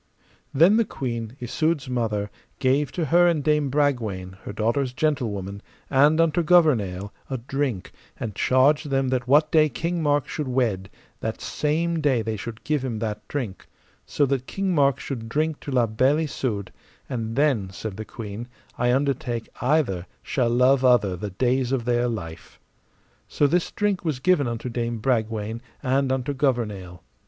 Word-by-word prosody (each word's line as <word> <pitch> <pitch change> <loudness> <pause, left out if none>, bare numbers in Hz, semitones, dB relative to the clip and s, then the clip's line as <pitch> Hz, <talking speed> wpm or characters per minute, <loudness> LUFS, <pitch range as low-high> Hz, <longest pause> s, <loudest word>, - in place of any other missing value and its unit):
Then 170 +10 +5
the 230 - +4
queen, 115 - -5
Isoud's 150 +4 -1
mother, 110 -5 -1 0.3
gave 135 +1 +1
to 165 - -1
her 175 +4 +5
and 160 -4 +1
Dame 150 -1 +2
Bragwaine, 115 -10 -1
her - - -4
daughter's 120 +5 0
gentlewoman, 110 -9 -2 0.3
and 145 +4 +5
unto 165 0 +3
Gouvernail, 120 - +3 0.2
a 135 - -2
drink, 130 -4 -3 0.3
and 110 -3 -4
charged 140 +7 +3
them 135 -1 +1
that 125 -1 -1
what 150 +3 +4
day 155 -1 +5
King 170 +3 -2
Mark 145 -2 +1
should 150 -3 -4
wed, 115 -7 0 0.3
that 110 0 -4
same 160 +2 -1
day 130 -6 +2
they 110 0 -2
should 110 +3 -7
give 150 -3 0
him 120 -4 -3
that 105 -1 -4
drink, 120 -10 -5 0.4
so 145 - +1
that 130 -1 -1
King 195 -1 -1
Mark 140 -4 +3
should 115 -5 -5
drink 155 +4 0
to 140 - -7
La 125 -2 +3
Beale 130 +8 +2
Isoud, 120 -10 -3 0.4
and 115 -3 -4
then, 135 -9 +2
said 100 +1 -6
the 110 - -5
queen, 110 +1 -7 0.3
I 120 0 +3
undertake 130 -3 -1
either 125 - +1 0.2
shall 125 -4 0
love 125 +2 +4
other 115 -7 +4
the 105 +4 -5
days 125 +5 0
of 130 -4 -1
their 120 0 +2
life. 90 -9 -6 0.7
So 145 - +1
this 170 +4 +2
drink 205 -3 0
was 155 -6 -1
given 150 -2 +3
unto 115 +1 -4
Dame 120 -1 -2
Bragwaine, 110 -1 -1 0.2
and 135 +1 +1
unto 130 +2 -1
Gouvernail. 105 -10 -2
130 Hz, 165 wpm, -24 LUFS, 110-145 Hz, 0.7 s, Then